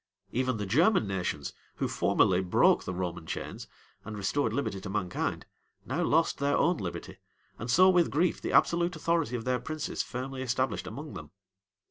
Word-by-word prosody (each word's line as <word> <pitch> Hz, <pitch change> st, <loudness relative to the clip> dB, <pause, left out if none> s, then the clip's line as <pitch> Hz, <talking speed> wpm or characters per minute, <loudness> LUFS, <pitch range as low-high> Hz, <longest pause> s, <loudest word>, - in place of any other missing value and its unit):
Even 130 Hz, 0 st, 0 dB
the 105 Hz, -, -3 dB
German 160 Hz, -, +3 dB
nations, 90 Hz, -8 st, -3 dB, 0.2 s
who -, -, -1 dB
formerly 90 Hz, 0 st, +2 dB
broke 90 Hz, -1 st, +3 dB
the 95 Hz, -, -3 dB
Roman 90 Hz, -2 st, -4 dB
chains, -, -, -5 dB, 0.4 s
and 110 Hz, 0 st, -7 dB
restored 110 Hz, +5 st, 0 dB
liberty 110 Hz, -6 st, -2 dB
to 95 Hz, -, -6 dB
mankind, 95 Hz, -3 st, -2 dB, 0.4 s
now 140 Hz, +8 st, -2 dB
lost 165 Hz, -1 st, +2 dB
their 140 Hz, 0 st, +2 dB
own 175 Hz, 0 st, +3 dB
liberty, 90 Hz, -3 st, -6 dB, 0.4 s
and 120 Hz, -, -5 dB
saw 185 Hz, +9 st, +6 dB
with 180 Hz, -3 st, +4 dB
grief 170 Hz, +5 st, +1 dB
the -, -, -3 dB
absolute 170 Hz, +1 st, +3 dB
authority 160 Hz, -6 st, 0 dB
of 115 Hz, -, -4 dB
their 125 Hz, -1 st, +1 dB
princes 155 Hz, +5 st, -3 dB
firmly 130 Hz, +1 st, -5 dB
established 130 Hz, +1 st, -1 dB
among 150 Hz, +1 st, -7 dB
them. 75 Hz, -1 st, -8 dB
125 Hz, 170 wpm, -29 LUFS, 95-155 Hz, 0.4 s, saw